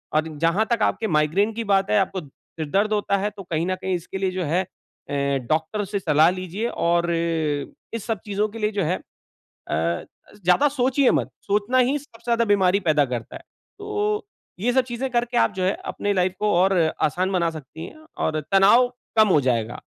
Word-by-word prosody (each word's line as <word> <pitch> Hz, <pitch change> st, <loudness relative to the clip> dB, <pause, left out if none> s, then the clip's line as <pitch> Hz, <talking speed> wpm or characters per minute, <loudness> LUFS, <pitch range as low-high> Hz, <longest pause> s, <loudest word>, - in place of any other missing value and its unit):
और 155 Hz, +1 st, +2 dB
जहाँ 170 Hz, +7 st, +2 dB
तक 230 Hz, -, -1 dB
आपके 220 Hz, -, 0 dB
माइग्रेन 165 Hz, +7 st, +2 dB
की 230 Hz, +1 st, -3 dB
बात 195 Hz, 0 st, +2 dB
है 215 Hz, -, +4 dB
आपको 190 Hz, -1 st, -1 dB
सिर-दर्द 165 Hz, +8 st, -3 dB
होता 205 Hz, -1 st, +1 dB
है 200 Hz, +2 st, -1 dB
तो 200 Hz, -1 st, -11 dB
कहीं 165 Hz, -1 st, -2 dB
न 185 Hz, -, 0 dB
कहीं 185 Hz, 0 st, -2 dB
इसके 175 Hz, +2 st, -6 dB
लिए 190 Hz, -1 st, 0 dB
जो 185 Hz, -1 st, -3 dB
है 170 Hz, +5 st, +1 dB
अ, -, -, -18 dB, 0.8 s
डॉक्टर 160 Hz, +7 st, 0 dB
से 200 Hz, +1 st, -3 dB
सलाह 155 Hz, -2 st, +4 dB
लीजिये 185 Hz, +4 st, -4 dB, 0.2 s
और 170 Hz, 0 st, +2 dB
इस 165 Hz, +5 st, -3 dB
सब 225 Hz, -5 st, -2 dB
चीज़ों 205 Hz, +1 st, 0 dB
के 225 Hz, +2 st, -9 dB
लिए 210 Hz, 0 st, 0 dB
जो 200 Hz, -3 st, -1 dB
है 175 Hz, +4 st, 0 dB
अ, -, -, -13 dB, 1.4 s
ज़्यादा 180 Hz, +12 st, +4 dB
सोचिये 265 Hz, 0 st, +2 dB
मत, -, -, 0 dB
सोचना 210 Hz, +5 st, 0 dB
ही 255 Hz, +3 st, +3 dB
सबसे 250 Hz, -5 st, -18 dB
ज़्यादा 235 Hz, -1 st, +2 dB
बीमारी 195 Hz, -2 st, +3 dB
पैदा 155 Hz, -6 st, +2 dB
करता 120 Hz, -2 st, -5 dB
है। -, -, -9 dB, 0.4 s
तो 420 Hz, +1 st, -2 dB, 0.3 s
ये 240 Hz, +4 st, +1 dB
सब 260 Hz, -1 st, +4 dB
चीज़ें 255 Hz, +2 st, -3 dB
करके 240 Hz, 0 st, 0 dB
आप -, -, +3 dB
जो 185 Hz, 0 st, -3 dB
है 190 Hz, +2 st, +2 dB, 0.2 s
अपनी 205 Hz, 0 st, -1 dB
लाइफ़ 185 Hz, -1 st, +1 dB
को 210 Hz, 0 st, +1 dB
और 190 Hz, +2 st, +4 dB, 0.3 s
आसान 185 Hz, +5 st, +1 dB
बना 170 Hz, -3 st, +1 dB
सकती 155 Hz, +1 st, -9 dB
है 310 Hz, -, -13 dB, 0.2 s
और 155 Hz, 0 st, 0 dB
तनाव 205 Hz, +6 st, +6 dB, 0.3 s
कम 215 Hz, 0 st, +7 dB
हो 165 Hz, -, +5 dB
जाएगा। 120 Hz, -3 st, -1 dB
195 Hz, 200 wpm, -23 LUFS, 170-220 Hz, 1.4 s, कम